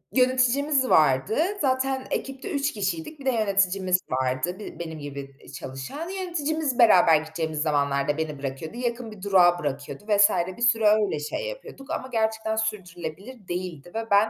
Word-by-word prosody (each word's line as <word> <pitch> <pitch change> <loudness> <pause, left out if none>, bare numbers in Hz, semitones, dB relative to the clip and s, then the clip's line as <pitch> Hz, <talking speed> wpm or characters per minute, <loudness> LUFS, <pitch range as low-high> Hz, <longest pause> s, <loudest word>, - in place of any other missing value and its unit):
yöneticimiz 260 +2 +3
vardı. 135 - +3 0.2
Zaten 265 -1 0
ekipte 270 +8 -4
3 285 0 0
kişiydik, 195 - -3
bir 275 - -11
de 265 - +3
yöneticimiz 195 -4 +2
vardı 130 +9 -1
bi 210 - -9
benim 160 -2 -6
gibi, 140 -1 -8
iii, 135 - -14
çalışan. 135 - -6
Yöneticimiz 315 -7 -2
beraber 180 -8 +7
gideceğimiz 160 -1 -3
zamanlarda 145 -1 +1
beni 155 -3 -3
bırakıyordu. 140 - -5
Yakın 240 -2 -3
bir 210 -3 -12
durağa 180 -3 +4
bırakıyordu 140 +2 -5
vs. 205 -1 +6 0.3
bir - - -11
süre 230 -3 +4
öyle 210 -7 +3
şey 155 - -4
yapıyorduk 320 - -10
ama 260 -5 -3
gerçekten 220 -1 0
sürdürülebilir 200 0 -5
değildi 175 -3 -5
ve 225 0 -3
ben 205 +2 +5
200 Hz, 155 wpm, -25 LUFS, 160-255 Hz, 0.3 s, beraber